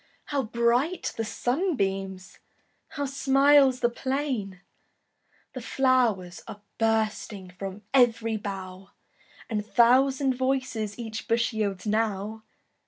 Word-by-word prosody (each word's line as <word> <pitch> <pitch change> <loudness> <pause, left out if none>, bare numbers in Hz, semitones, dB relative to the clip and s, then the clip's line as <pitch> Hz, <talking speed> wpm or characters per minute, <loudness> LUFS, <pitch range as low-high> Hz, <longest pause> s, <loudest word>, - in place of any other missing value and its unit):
How 285 -2 -1
bright 240 +8 0
the 225 - -2
sunbeams! 195 - -2 0.5
How 285 -1 -4
smiles 275 -1 +4
the 240 - +3
plain! 255 -8 -3 0.9
The 255 - -6
flow'rs 230 -8 +1
are 210 -2 -9 0.2
bursting 215 -4 -1
From 195 +3 -7
ev'ry 230 -3 +3
bough, 190 -2 -7 0.6
And 210 -3 -2
thousand 260 +4 +3
voices 255 -5 -2
Each 220 -2 -6
bush 235 +1 +1
yields 200 -3 -2
now. 215 0 -1
225 Hz, 105 wpm, -26 LUFS, 205-260 Hz, 0.9 s, smiles